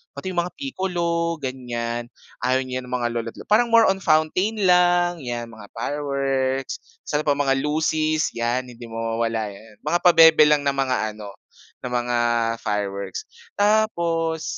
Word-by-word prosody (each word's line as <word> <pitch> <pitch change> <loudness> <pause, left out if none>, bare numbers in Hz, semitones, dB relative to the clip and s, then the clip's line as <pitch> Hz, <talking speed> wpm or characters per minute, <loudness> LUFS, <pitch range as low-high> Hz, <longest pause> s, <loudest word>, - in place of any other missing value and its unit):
Pati 165 +7 -5
'yung 175 - -1
mga 175 +1 -2
Piccolo 175 -10 -2
ganyan, 120 -2 -4 0.3
ayaw 130 +1 +1
niyan 130 -1 -5
ng 125 - -8
mga - - +2
lolo't 115 -1 -4
lo - - -10
parang 225 +3 +3
more 230 0 +6
on 195 - -3
fountain 185 +6 +1
lang 175 -1 +3
'yan 120 -4 -4
mga 110 -2 -12
fireworks. 135 +1 -2 0.2
Tapos 150 - -1
ano - - -2
pa, 145 - +3
mga 135 -1 +1
lusis 155 +1 0
'yan. 120 +2 -2
Hindi 120 0 -11
mawawala 115 -1 -2
'yan. 105 +2 -16
Mga 170 +4 +1
pabebe 160 -3 +7
lang 150 -1 +3
na 140 - +2
mga 130 -5 -1
ano 105 -2 -10 0.5
na 125 - -5
mga 120 0 -1 0.5
fireworks. 100 -2 -3 0.3
Tapos, 170 -7 +1
140 Hz, 155 wpm, -23 LUFS, 120-170 Hz, 0.5 s, pabebe